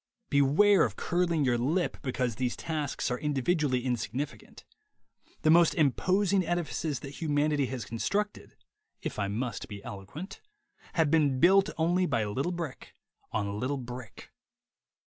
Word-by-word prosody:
Beware 150 +9 +5
of - - -1
curling 170 -4 +1
your 120 -2 +2
lip 160 +9 0
because 130 -3 -1
these 125 -2 -1
tasks 150 -5 -3
are 125 - -1
individually 145 -2 0
insignificant. 125 +3 -4 0.8
The 155 - +5
most 170 0 +5
imposing 185 +6 +2
edifices 165 -4 -2
that 140 - -7
humanity 145 -2 +1
has 125 -4 -5
constructed 205 - -2 0.5
(if - - -4
I 100 - 0
must 115 +3 -3
be 100 -2 -9
eloquent) 100 - -8 0.5
have 160 -4 +2
been 145 -5 +3
built 195 +4 +5
only 175 +3 +2
by 115 -7 0
little 130 +12 -1
brick 170 -6 -6 0.4
on 100 -1 -2
little 135 +4 -1
brick. 125 -3 -9
145 Hz, 135 wpm, -29 LUFS, 125-170 Hz, 0.8 s, Beware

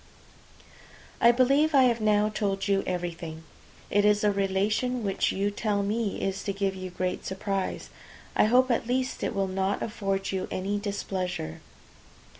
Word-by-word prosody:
I 235 - +8
believe 275 +5 +3
I 270 - +7
have 235 -2 +2
now 210 0 +3
told 200 -2 -1
you 195 -1 +2
everything. 170 -3 -4 0.5
It 205 +1 +3
is 210 0 +3
a 210 - +4
relation 205 +5 0
which 195 -2 +1
you 200 +1 0
tell 205 -1 -1
me 210 0 -1
is 195 0 -2
to 200 - -1
give 195 -1 -1
you 185 -1 -6
great 180 0 -3
surprise; 190 0 -3 0.4
I - - +5
hope 250 +3 +4
at 230 0 0
least 255 +1 -1
it - - -2
will 195 -1 +1
not 190 +1 -1
afford 195 -3 -2
you 190 -1 -2
any 200 +2 -2
displeasure. 185 - -4
200 Hz, 160 wpm, -27 LUFS, 190-215 Hz, 0.5 s, I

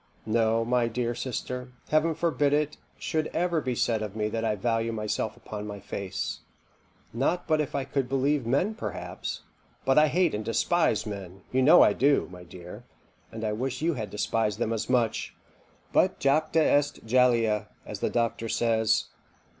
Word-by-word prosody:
No, 115 +1 +2
my 120 0 +2
dear 120 +1 -1
sister, 125 +1 -5 0.2
Heaven 155 +1 +2
forbid 150 -3 +1
it 150 0 0 0.2
should 155 -1 -1
ever 170 -1 +1
be 130 -3 -2
said 115 -2 +1
of 105 -1 -5
me 105 -1 -1
that 115 +1 -3
I 110 -2 +1
value 115 +2 0
myself 110 0 -2
upon 105 -3 -7
my 105 -1 -6
face 95 -1 -4 0.7
not 140 +9 0
but 155 -1 +3
if 145 - -4
I 140 - 0
could 135 -3 -2
believe 135 +1 +1
men 145 - +1
perhaps 220 - -5 0.4
but 135 +2 +5
I 155 - +5
hate 175 +1 +2
and 105 - -2
despise 115 +3 +1
men 95 -3 -7
you 130 - +2
know 140 +4 +8
I 105 - +4
do, 140 +4 +3
my 90 -1 -10
dear, 90 0 -11 0.5
and 110 0 -7
I 105 -1 0
wish 130 +5 -3
you 170 +1 +2
had 110 -6 -4
despised 105 0 -1
them 115 -1 -1
as 110 - -3
much; 120 -4 0 0.6
but - - +3
jacta 155 +3 +2
est 145 -4 +1
jalea, 115 -3 +3 0.2
as - - -6
the - - 0
doctor 115 -1 -1
says. 110 -2 +2
120 Hz, 175 wpm, -27 LUFS, 110-145 Hz, 0.7 s, know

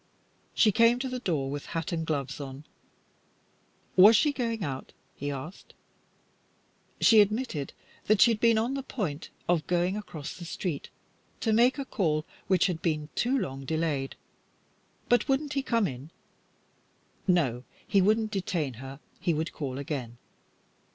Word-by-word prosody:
She 215 - +5
came 230 +3 +5
to 260 +1 -3
the 255 -1 -4
door 150 - -1
with 145 0 -5
hat 165 +1 -3
and 165 -1 -2
gloves 140 -3 -2
on. 135 +1 -8 1.3
Was 205 +5 +9
she 290 +7 +3
going 230 -5 -2
out? 135 -5 -5 0.2
he 145 - -4
asked. 140 +6 -8 1.2
She 220 -2 +7
admitted 205 - -1 0.3
that 215 -1 +3
she 235 - +7
had 220 - -1
been 230 -1 +4
on 235 +4 0
the 275 - -2
point 180 - -4 0.2
of 170 -3 +1
going 180 +2 +1
across 165 -8 -6
the 180 - -9
street 170 -3 -4 0.5
to 225 - +2
make 245 +5 +4
a 275 - -3
call 160 -11 0 0.2
which 185 -2 +3
had 175 -4 -1
been 155 -3 -1
too 255 +3 +1
long 135 - -3
delayed, 150 -2 -1 0.9
but 245 - +3
wouldn't 285 +2 +1
he 275 - +1
come 230 -5 +1
in. 135 -1 -6 1.2
No, 135 -10 +2 0.2
he 200 -2 +4
would 210 +4 +4
not 220 -1 -3
detain 175 - -2
her; 135 +1 -8 0.2
he 170 - +1
would 160 +2 -2
call 135 -4 -4
again. 130 -5 -4
175 Hz, 160 wpm, -28 LUFS, 145-225 Hz, 1.3 s, Was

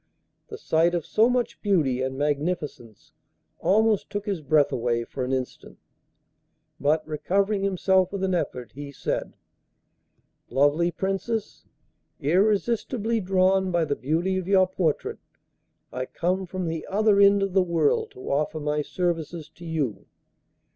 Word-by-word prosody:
The - - -8
sight 165 +2 +2
of 170 - -2
so 225 +3 +3
much 250 -1 -1
beauty 155 - +1
and 130 0 -2
magnificence 145 - -3 0.5
almost 215 +1 +2
took 205 0 -4
his 195 -6 -2
breath 145 0 +3
away 120 -1 0
for 130 +2 -5
an 125 - -2
instant, 130 -1 -4 1.0
but, 155 +2 +1
recovering 195 +6 0
himself 190 -1 +2
with 200 -1 -4
an 190 -1 +1
effort, 125 -8 -3
he 145 +1 -8
said: - - -3 1.1
'Lovely 145 +5 +3
Princess, 195 +5 -3 0.5
irresistibly 215 - +1
drawn 190 0 +2
by 170 -2 +1
the 145 -2 -1
beauty 170 +8 0
of 185 - -6
your 190 -1 +5
portrait, 180 -5 -1 0.7
I 130 0 -3
come 185 +2 -1
from 185 0 -4
the 160 -1 -4
other 210 0 +3
end 200 0 +6
of 195 -2 -2
the 190 - +5
world 170 -5 +1
to 130 - -7
offer 150 +3 0
my 150 0 -1
services 165 -1 -3
to 175 - -14
you. 145 -11 -3
175 Hz, 140 wpm, -25 LUFS, 150-195 Hz, 1.1 s, end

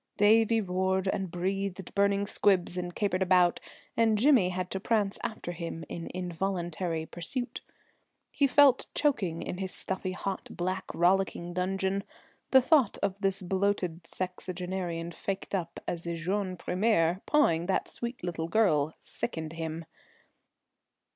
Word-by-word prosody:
Davie 225 +2 +5
roared 190 0 0
and 190 -1 -1
breathed 190 +1 -3
burning 200 0 +2
squibs 190 -4 +2
and 175 -1 -4
capered 195 -3 0
about, 180 -2 +4 0.4
and 225 -2 +3
Jimmy 240 -6 +5
had 185 0 -3
to 190 - -1
prance 205 -1 0
after 215 -5 -4
him 165 -1 -5
in 165 - -5
involuntary 175 -2 -2
pursuit. 245 +11 -5 0.7
He 280 - +3
felt 275 0 +5
choking 210 - +1
in 180 - -5
his 190 -1 -3
stuffy 190 0 -3
hot 195 +1 -4
black 185 +2 -2
rollicking 175 -1 +2
dungeon. 190 +2 0 0.5
The 265 -1 +6
thought 275 -6 +4
of 195 +1 -1
this 195 -1 0
bloated 185 -2 0
sexagenarian 180 -2 -4
faked 195 +4 -4
up 175 -4 -2
as 170 -1 -3
a 170 - -1
jeune 185 +2 -2
premier, 180 -2 +1
pawing 175 - +3
that 195 - +1
sweet 235 -2 -5
little 165 -2 -2
girl, 165 -7 +2
sickened 160 -8 -5
him. 165 0 -4
185 Hz, 135 wpm, -29 LUFS, 175-200 Hz, 0.7 s, The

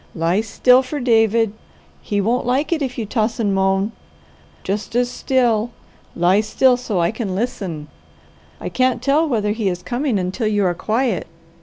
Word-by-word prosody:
Lie 170 +5 +1
still 250 +3 +4
for 275 +3 -5
David. 225 -3 +2 0.5
He 205 -1 -1
won't 235 +5 0
like 275 +7 +1
it 320 - -2
if 260 -2 -3
you 230 - -2
toss 225 +2 -1
and 205 -3 +1
moan. 195 +2 +1 0.7
Just 205 +4 -3
as 245 0 +1
still, 240 -4 +1 0.5
lie 180 +4 +3
still 250 +4 +3
so 240 -6 -3
I 170 +2 +2
can 215 -4 -4
listen. 190 - -3 0.7
I - - -5
can't 255 -1 0
tell 300 +3 +2
whether 210 -5 0
he 215 -2 -1
is 180 -1 -5
coming 250 -2 -1
until 190 +5 -2
you 205 -2 +1
are 180 - +2
quiet." 220 +2 -1
220 Hz, 170 wpm, -20 LUFS, 195-250 Hz, 0.7 s, still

